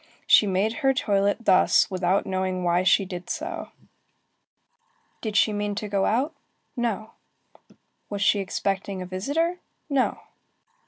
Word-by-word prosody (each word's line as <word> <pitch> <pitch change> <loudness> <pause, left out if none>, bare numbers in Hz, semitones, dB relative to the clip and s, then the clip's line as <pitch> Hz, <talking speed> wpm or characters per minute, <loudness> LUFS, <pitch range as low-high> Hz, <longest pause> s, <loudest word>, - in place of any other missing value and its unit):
She 210 - +6
made 200 +4 0
her 270 -1 +3
toilet 205 -1 0
thus 185 - +4
without 185 +1 +1
knowing 185 -1 -2
why 175 0 +2
she 190 +1 +3
did 180 -1 -7
so. 320 0 -4 1.5
Did 215 -2 -2
she 215 - +3
mean 205 0 -2
to 210 +1 -4
go 200 -1 0
out? 265 +8 0 0.4
No. 225 -3 -2 1.0
Was 205 -1 -2
she 205 - +3
expecting 195 0 -2
a - - -7
visitor? 290 - -1 0.3
No. 270 -2 +1
200 Hz, 130 wpm, -25 LUFS, 190-230 Hz, 1.5 s, She